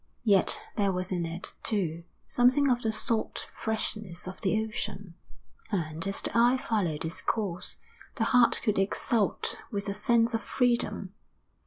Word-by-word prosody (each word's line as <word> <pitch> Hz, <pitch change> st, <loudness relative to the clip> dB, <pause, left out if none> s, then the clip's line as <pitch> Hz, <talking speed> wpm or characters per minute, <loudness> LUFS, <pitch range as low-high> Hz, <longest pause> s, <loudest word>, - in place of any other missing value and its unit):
Yet 200 Hz, -5 st, +4 dB, 0.2 s
there 200 Hz, -2 st, +2 dB
was 185 Hz, 0 st, -1 dB
in 175 Hz, -2 st, -1 dB
it, 165 Hz, +2 st, -5 dB
too, 170 Hz, -6 st, -1 dB, 0.2 s
something 260 Hz, +3 st, +3 dB
of 245 Hz, 0 st, +1 dB
the 220 Hz, -, 0 dB
salt 220 Hz, 0 st, -1 dB
freshness 215 Hz, -5 st, -3 dB
of 185 Hz, -, -8 dB
the 215 Hz, +3 st, +1 dB
ocean, 205 Hz, -4 st, -5 dB, 0.6 s
and, 165 Hz, -2 st, -2 dB
as 195 Hz, -, +1 dB
the -, -, -3 dB
eye 240 Hz, +2 st, +5 dB
followed 185 Hz, -12 st, -1 dB
its 160 Hz, -, -4 dB
course, 195 Hz, -6 st, -2 dB, 0.4 s
the -, -, 0 dB
heart 245 Hz, -2 st, +4 dB
could 215 Hz, -4 st, +1 dB
exult 205 Hz, +2 st, 0 dB
with 200 Hz, -2 st, -3 dB
a 200 Hz, -, -1 dB
sense 230 Hz, +3 st, +2 dB
of 225 Hz, -, 0 dB
freedom. 210 Hz, -5 st, 0 dB
210 Hz, 155 wpm, -29 LUFS, 185-230 Hz, 0.6 s, eye